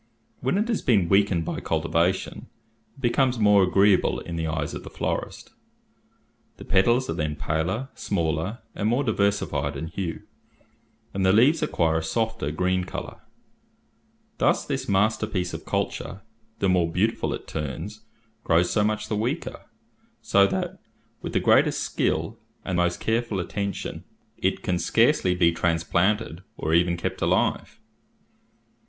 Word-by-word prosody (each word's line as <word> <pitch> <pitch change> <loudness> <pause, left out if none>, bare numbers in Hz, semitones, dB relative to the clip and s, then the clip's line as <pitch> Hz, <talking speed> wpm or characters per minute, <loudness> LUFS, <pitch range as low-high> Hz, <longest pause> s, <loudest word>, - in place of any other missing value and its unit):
When 130 +9 0
it 215 +3 +1
has 230 -3 0
been 100 -8 +3
weakened 95 -4 +3
by - - -3
cultivation, 85 +3 -1 0.5
it 135 - -16
becomes 125 0 +2
more 105 -2 +5
agreeable 95 +1 +3
in 85 - -6
the 80 -1 -2
eyes 80 -2 -2
of - - -6
the - - -9
florist. - - -4 1.1
The - - -10
petals 120 +7 +3
are - - -1
then 75 -2 -2
paler, 85 - -2
smaller, 85 +4 -2
and 105 - -1
more 125 +5 +1
diversified 100 - 0
in 80 - -4
hue; 85 -1 -4 0.9
and 95 - -1
the 95 - +5
leaves 130 +10 +4
acquire 80 -1 +1
a - - -5
softer 110 -2 -1
green 90 +4 0
colour. 90 - -7 1.2
Thus - - +2
this - - -3
masterpiece 100 -2 +1
of - - -7
culture, 100 - -3 0.4
the 100 - +1
more 90 -3 +2
beautiful - - 0
it - - -11
turns, 80 +8 -5 0.4
grows 85 +1 +3
so 105 - +2
much 105 0 -1
the 110 - -1
weaker, 125 +10 -3 0.5
so 100 0 +4
that, 95 - -3 0.4
with - - -5
the - - +3
greatest - - +4
skill 115 +2 -1 0.3
and 95 -2 -1
most 90 0 +1
careful 115 -3 -1
attention, 100 +2 -4 0.4
it - - 0
can 90 -1 0
scarcely 90 +1 +3
be 85 -2 +4
transplanted, 85 +3 0 0.2
or 80 - -1
even 85 +1 +3
kept 85 - -4
alive." - - 0
95 Hz, 145 wpm, -25 LUFS, 85-110 Hz, 1.2 s, more